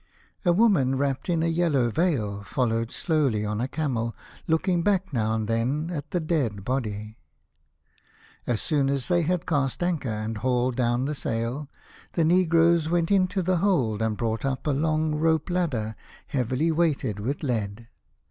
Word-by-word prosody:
A 175 - +4
woman 170 - +3
wrapped 140 +3 -1
in 165 -2 +1
a - - +2
yellow 165 -8 +2
veil 115 - 0
followed 115 +2 -1
slowly 140 - 0
on 105 +1 -2
a 125 - 0
camel, 125 -7 -2 0.3
looking 170 +2 +2
back 190 -3 +1
now 110 -2 +1
and 110 -1 -2
then 130 +9 0
at 150 -2 -5
the 180 - 0
dead 135 - -1
body. 110 -4 -3 1.3
As 120 -3 0
soon 145 -4 +1
as 140 +1 -1
they 175 -1 +3
had 170 +1 0
cast 140 0 0
anchor 170 -8 -1
and 110 0 -3
hauled 125 +1 +1
down 120 0 +1
the 150 - -1
sail, 125 +2 -3 0.4
the 165 - +2
negroes 170 -1 +4
went 170 +1 +1
into 190 -1 +2
the 185 +1 +2
hold 140 - +1
and 110 -1 0
brought 115 -2 -2
up 135 -1 -2
a 150 - +2
long 155 +2 +1
rope 160 +2 +1
ladder, 125 -12 -1 0.3
heavily 130 +5 0
weighted 155 - 0
with 135 +9 -3
lead. 115 -4 -2
140 Hz, 165 wpm, -26 LUFS, 115-165 Hz, 1.3 s, A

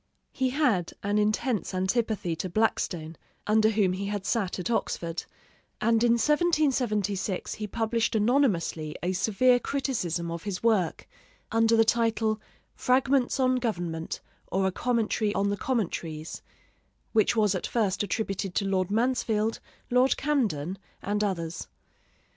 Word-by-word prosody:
He 260 -1 0
had 250 - +1
an 205 +1 +1
intense 215 -1 0
antipathy 190 -2 0
to 185 - -3
Blackstone, 175 -5 -1 0.3
under 215 +1 +4
whom 205 -4 +2
he 195 +2 -3
had 205 -1 -3
sat 200 -6 0
at 180 +5 -3
Oxford; 170 -6 -2 0.5
and 230 +1 +2
in 235 -1 +5
1776 245 - +1
he 215 - -5
published 230 +2 0
anonymously 210 - +1
a 180 +1 0
severe 225 +6 +3
criticism 180 - -2
of 170 0 -4
his 200 0 -5
work, 210 -8 +1 0.4
under 225 0 +4
the 225 - +5
title 225 -1 +1 0.3
'Fragments 260 +1 +2
on 255 -1 +3
Government, 175 -9 -3 0.3
or 190 +1 0
a 190 - +2
Commentary 220 -1 0
on 200 +1 +1
the - - 0
Commentaries,' 165 -9 -2 0.7
which 220 +2 +3
was 210 -3 +3
at 185 - -2
first 210 -5 0
attributed 195 -3 -2
to 200 - +1
Lord 190 -1 0
Mansfield, 225 -1 0 0.3
Lord 250 +2 +4
Camden, 200 - -1 0.2
and 210 +1 0
others. 170 - -3
215 Hz, 135 wpm, -27 LUFS, 185-235 Hz, 0.7 s, in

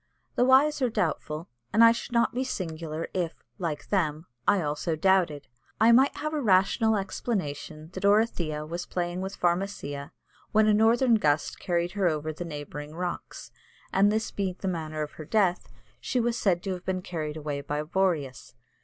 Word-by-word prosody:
_ - - -41
The 245 - +3
wise 280 +3 +5
are 255 - +3
doubtful, 160 -4 -2 0.2
and 225 - +5
I 230 - +9
should 235 +2 -4
not 235 -1 +2
be 255 +2 0
singular 165 -8 -4
if, 175 -3 -1 0.2
like 165 -5 -3
them, 160 -5 0 0.2
I 200 - +5
also 150 +1 -1
doubted. 170 -4 +2 0.3
I 225 +2 +6
might 265 +4 +5
have 305 +1 -3
a 300 - 0
rational 215 +1 +3
explanation 165 -6 -4
that 185 - -6
Orithyia 195 -8 +2
was 170 +2 -5
playing 175 0 -2
with 190 +1 -4
Pharmacia, 175 -6 -1 0.4
when 215 0 +5
a 215 - +4
northern 230 +2 +4
gust 150 -4 +1
carried 175 -1 0
her 195 -1 +1
over 155 -1 -1
the 165 - -6
neighbouring 150 -1 -7
rocks; 180 0 -5 0.4
and 200 +2 +4
this 220 +1 -1
being 190 -3 -2
the 195 - -4
manner 155 -3 -2
of 150 - -6
her 155 - -9
death, 190 -1 +1 0.3
she 255 - -1
was 235 0 +1
said 185 -6 +1
to 195 - -2
have 180 -1 -7
been 185 -1 -2
carried 155 -4 -4
away 145 -2 -3
by 145 +1 -3
Boreas. 155 -8 -1
180 Hz, 180 wpm, -27 LUFS, 155-215 Hz, 0.4 s, I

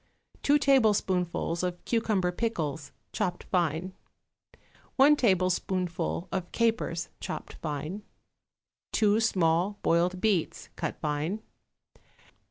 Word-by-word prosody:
2 290 +1 +4
tablespoonfuls 200 - +2
of 180 -1 -3
cucumber 210 -6 +1
pickles, 160 -9 -3 0.2
chopped 175 - -2
fine. 175 0 0 1.0
1 285 +2 +7
tablespoonful 185 - 0
of 185 -2 -3
capers, 220 -8 0
chopped - - -6
fine. 155 +6 -4 0.9
2 210 0 +3
small 185 -2 +2
boiled 175 +2 +2
beets, 195 -5 0
cut - - -4
fine. 155 +8 -2
185 Hz, 90 wpm, -28 LUFS, 170-215 Hz, 1.0 s, 1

